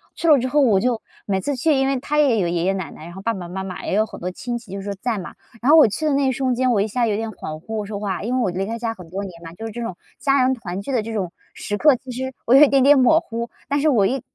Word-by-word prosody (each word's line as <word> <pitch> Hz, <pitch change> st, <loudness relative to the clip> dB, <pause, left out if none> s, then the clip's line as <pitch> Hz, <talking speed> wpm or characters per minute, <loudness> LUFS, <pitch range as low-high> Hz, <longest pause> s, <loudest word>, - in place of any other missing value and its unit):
去 335 Hz, -, -2 dB
了 300 Hz, -, +8 dB
之 255 Hz, -, -1 dB
后 295 Hz, +3 st, +2 dB
我 220 Hz, -8 st, +4 dB
就 240 Hz, +1 st, 0 dB, 0.2 s
每 195 Hz, -2 st, 0 dB
次 285 Hz, +5 st, -2 dB
去， 300 Hz, +5 st, +2 dB
因 270 Hz, 0 st, +2 dB
为 270 Hz, -1 st, 0 dB
他 295 Hz, +3 st, -2 dB
也 270 Hz, -6 st, +4 dB
有 175 Hz, -, +1 dB
爷 170 Hz, 0 st, -1 dB
爷 190 Hz, +2 st, +2 dB
奶 190 Hz, -3 st, -4 dB
奶， -, -, -12 dB
然 175 Hz, -, -10 dB
后 190 Hz, -, -9 dB
爸 230 Hz, +3 st, 0 dB
爸 180 Hz, -4 st, -6 dB
妈 190 Hz, +2 st, -5 dB
妈 185 Hz, -1 st, -7 dB
也 -, -, -2 dB
有 215 Hz, +2 st, +3 dB
很 -, -, -10 dB
多 180 Hz, -, -3 dB
亲 240 Hz, +5 st, -4 dB
戚 230 Hz, -5 st, -13 dB
就 195 Hz, 0 st, -5 dB
是 200 Hz, +1 st, -4 dB
在 225 Hz, +2 st, -2 dB
嘛， 180 Hz, -, -7 dB, 0.3 s
然 250 Hz, -, +1 dB
后 320 Hz, -, +8 dB
我 305 Hz, -, +8 dB
去 265 Hz, +9 st, -3 dB
的 300 Hz, -, +2 dB
那 275 Hz, -1 st, +2 dB
一 260 Hz, -, +2 dB
瞬 260 Hz, 0 st, 0 dB
间， 255 Hz, 0 st, +2 dB
我 205 Hz, -4 st, +2 dB
一 210 Hz, -, 0 dB
下 235 Hz, +3 st, 0 dB
有 210 Hz, -, 0 dB
点 225 Hz, 0 st, -3 dB
恍 155 Hz, -5 st, -7 dB
惚 220 Hz, +7 st, -7 dB
我 210 Hz, -1 st, -2 dB
说 205 Hz, -1 st, -5 dB
话， 195 Hz, -3 st, -3 dB
因 245 Hz, +4 st, -1 dB
为 255 Hz, -, +1 dB
我 195 Hz, -, +1 dB
离 190 Hz, +2 st, -2 dB
开 225 Hz, +3 st, -4 dB
家 225 Hz, -1 st, -2 dB
很 180 Hz, -6 st, -13 dB
多 195 Hz, +4 st, -4 dB
年 175 Hz, -4 st, -9 dB
了， 165 Hz, 0 st, -9 dB
就 225 Hz, -, -7 dB
是 225 Hz, -, -5 dB
这 240 Hz, +3 st, -6 dB
种 190 Hz, -6 st, -5 dB, 0.2 s
家 275 Hz, -1 st, +3 dB
人 260 Hz, +1 st, +3 dB
团 195 Hz, -6 st, -5 dB
聚 275 Hz, -, -5 dB
的 250 Hz, -4 st, +1 dB
这 225 Hz, +2 st, -6 dB
种 185 Hz, -5 st, -2 dB, 0.2 s
时 205 Hz, -, -4 dB
刻， 295 Hz, +3 st, +5 dB
其 260 Hz, +1 st, -10 dB
实 260 Hz, +2 st, -4 dB
我 235 Hz, -, +3 dB
有 280 Hz, -, +9 dB
一 -, -, +7 dB
点 275 Hz, -1 st, +3 dB
点 285 Hz, +2 st, +7 dB
模 265 Hz, +5 st, +5 dB
糊， 235 Hz, -6 st, -5 dB, 0.2 s
但 285 Hz, -, 0 dB
是 310 Hz, -, +3 dB
我 225 Hz, -8 st, +3 dB
一 260 Hz, +5 st, 0 dB
230 Hz, 370 characters per minute, -21 LUFS, 195-260 Hz, 0.3 s, 有